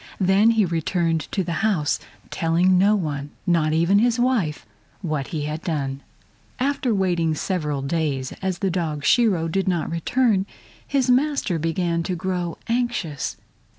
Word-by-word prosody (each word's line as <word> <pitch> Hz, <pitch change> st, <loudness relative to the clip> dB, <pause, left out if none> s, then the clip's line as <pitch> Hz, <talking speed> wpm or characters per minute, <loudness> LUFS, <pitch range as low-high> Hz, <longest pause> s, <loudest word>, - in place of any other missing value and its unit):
Then 195 Hz, +3 st, +4 dB
he 225 Hz, -3 st, +3 dB
returned 165 Hz, -1 st, 0 dB
to 190 Hz, -, 0 dB
the 170 Hz, -, -4 dB
house, 195 Hz, -10 st, +1 dB, 0.3 s
telling 175 Hz, +2 st, +2 dB
no 205 Hz, +3 st, +4 dB
one, 145 Hz, -7 st, -3 dB, 0.2 s
not 165 Hz, -3 st, +2 dB
even 170 Hz, +5 st, +3 dB
his 240 Hz, +1 st, +2 dB
wife, 220 Hz, -, 0 dB, 0.4 s
what 155 Hz, -7 st, -2 dB
he 155 Hz, -3 st, -3 dB
had 150 Hz, +2 st, -4 dB
done. 140 Hz, -5 st, -3 dB, 0.6 s
After 270 Hz, -1 st, 0 dB
waiting 175 Hz, -6 st, +1 dB
several 150 Hz, -5 st, -2 dB
days, 140 Hz, -3 st, -1 dB
as 190 Hz, -2 st, -1 dB
the 190 Hz, -, +1 dB
dog 155 Hz, -5 st, -2 dB
Shiro 200 Hz, -10 st, +3 dB
did 195 Hz, +4 st, -1 dB
not 175 Hz, -4 st, 0 dB
return, 200 Hz, +3 st, +1 dB, 0.4 s
his 270 Hz, -2 st, +1 dB
master 260 Hz, -, +1 dB
began 170 Hz, +1 st, 0 dB
to 180 Hz, +2 st, -2 dB
grow 175 Hz, -1 st, -3 dB
anxious. 235 Hz, -, -2 dB
175 Hz, 150 wpm, -23 LUFS, 160-205 Hz, 0.6 s, Then